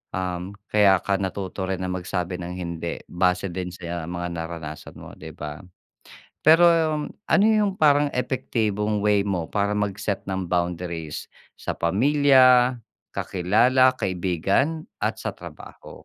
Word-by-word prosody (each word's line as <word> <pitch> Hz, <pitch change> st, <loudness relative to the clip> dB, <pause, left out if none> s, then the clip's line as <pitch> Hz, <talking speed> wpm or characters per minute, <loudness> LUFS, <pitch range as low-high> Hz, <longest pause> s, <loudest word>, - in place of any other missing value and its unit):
um, 90 Hz, +1 st, -4 dB, 0.2 s
kaya 100 Hz, -3 st, +5 dB
ka 100 Hz, -1 st, 0 dB
natuto 95 Hz, 0 st, -4 dB
rin 95 Hz, 0 st, -1 dB
na 90 Hz, -, -2 dB
magsabi 90 Hz, 0 st, -3 dB
ng 90 Hz, 0 st, -6 dB
hindi, 85 Hz, -2 st, -5 dB
base 90 Hz, +1 st, +1 dB
din 90 Hz, 0 st, -4 dB
sa 85 Hz, -1 st, -5 dB
mga 85 Hz, 0 st, -3 dB
naranasan 80 Hz, -2 st, -7 dB
mo, -, -, -11 dB
'di 80 Hz, -, -8 dB
ba? 75 Hz, 0 st, -7 dB, 0.9 s
Pero 160 Hz, +3 st, +7 dB, 0.5 s
ano 205 Hz, -1 st, +1 dB
yung 215 Hz, -3 st, +3 dB
parang 145 Hz, -2 st, +4 dB
epektibong 110 Hz, -5 st, -1 dB
way 105 Hz, -1 st, +3 dB
mo, 90 Hz, -5 st, -2 dB
para 100 Hz, 0 st, 0 dB
mag-set 100 Hz, 0 st, -2 dB
ng 95 Hz, -1 st, -2 dB
boundaries 85 Hz, -3 st, -3 dB, 0.3 s
sa -, -, -4 dB
pamilya, 130 Hz, -, +4 dB, 0.4 s
kakilala, 120 Hz, +8 st, +3 dB
kaibigan 95 Hz, -, 0 dB, 0.2 s
at -, -, -1 dB
sa -, -, -3 dB
trabaho, -, -, -12 dB
95 Hz, 130 wpm, -24 LUFS, 90-125 Hz, 0.9 s, Pero